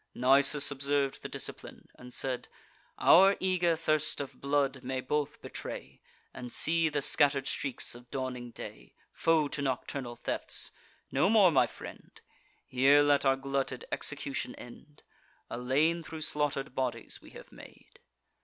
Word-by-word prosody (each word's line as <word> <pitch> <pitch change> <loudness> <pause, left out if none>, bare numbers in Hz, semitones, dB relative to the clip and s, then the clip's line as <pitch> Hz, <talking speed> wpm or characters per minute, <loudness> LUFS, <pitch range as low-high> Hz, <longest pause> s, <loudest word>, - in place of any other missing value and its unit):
Nisus 140 +3 +4
observ'd 140 0 0
the - - -7
discipline, - - -8
and 125 0 -13
said: 125 0 -3 0.5
"Our 195 +3 +6
eager 180 -3 +2
thirst 155 -1 +1
of 140 -2 -7
blood 140 -2 0
may 130 +1 -3
both 150 +3 -2
betray; 65 +1 -7 0.3
And 125 -2 -8
see 165 0 +2
the 145 -2 -1
scatter'd 140 -2 +3
streaks 135 -1 -2
of 120 0 -13
dawning 125 -2 -4
day, - - -10 0.2
Foe 160 -2 +2
to 140 - -3
nocturnal 130 -2 -3
thefts. - - -3 0.4
No 185 - +2
more, 210 -5 +6
my 135 - +4
friend; - - -12 0.5
Here 140 +3 +4
let 145 -1 +3
our 135 0 +4
glutted 135 0 -3
execution - - -2
end. - - -14 0.5
A 120 - -4
lane 150 +7 +1
thro' 160 0 -8
slaughter'd 145 -3 -1
bodies 130 -2 -3
we - - -14
have - - -14
made." - - -16
140 Hz, 145 wpm, -30 LUFS, 130-150 Hz, 0.5 s, Our